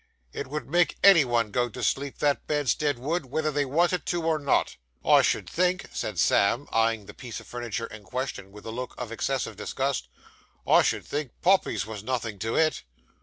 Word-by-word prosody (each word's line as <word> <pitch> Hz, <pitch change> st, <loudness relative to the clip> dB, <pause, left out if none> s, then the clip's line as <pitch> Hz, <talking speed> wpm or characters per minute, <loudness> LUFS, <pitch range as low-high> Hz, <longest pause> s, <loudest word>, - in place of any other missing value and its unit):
'It -, -, -4 dB
would 150 Hz, +3 st, -5 dB
make 175 Hz, +3 st, +2 dB
any 195 Hz, -6 st, +8 dB
one 120 Hz, -4 st, 0 dB
go 120 Hz, +2 st, +1 dB
to 120 Hz, +2 st, -7 dB
sleep, 140 Hz, 0 st, -1 dB
that 145 Hz, -1 st, 0 dB
bedstead 145 Hz, -1 st, +1 dB
would, 150 Hz, +4 st, -2 dB
whether 155 Hz, +4 st, -1 dB
they 145 Hz, 0 st, 0 dB
wanted 170 Hz, +5 st, +1 dB
to 175 Hz, -2 st, -2 dB
or 160 Hz, -1 st, +1 dB
not.' 140 Hz, -1 st, +1 dB, 0.3 s
'I -, -, +7 dB
should -, -, 0 dB
think,' 180 Hz, +1 st, 0 dB
said 105 Hz, -4 st, -3 dB
Sam, 100 Hz, -, +3 dB
eyeing 115 Hz, -2 st, +1 dB
the -, -, -11 dB
piece 125 Hz, -3 st, -7 dB
of -, -, -14 dB
furniture 120 Hz, -2 st, -4 dB
in 110 Hz, -1 st, -10 dB
question 125 Hz, -2 st, -5 dB
with 105 Hz, +1 st, -13 dB
a 110 Hz, -, -5 dB
look 125 Hz, +2 st, -5 dB
of 120 Hz, -2 st, -5 dB
excessive 115 Hz, -2 st, -2 dB
disgust 130 Hz, -, -2 dB, 0.6 s
'I -, -, +6 dB
should -, -, 0 dB
think 145 Hz, -4 st, -4 dB
poppies 180 Hz, -, +3 dB
was 105 Hz, -2 st, -7 dB
nothing 115 Hz, -4 st, -3 dB
to 115 Hz, +2 st, -2 dB
it. 160 Hz, -1 st, +2 dB
130 Hz, 195 wpm, -27 LUFS, 115-150 Hz, 0.6 s, any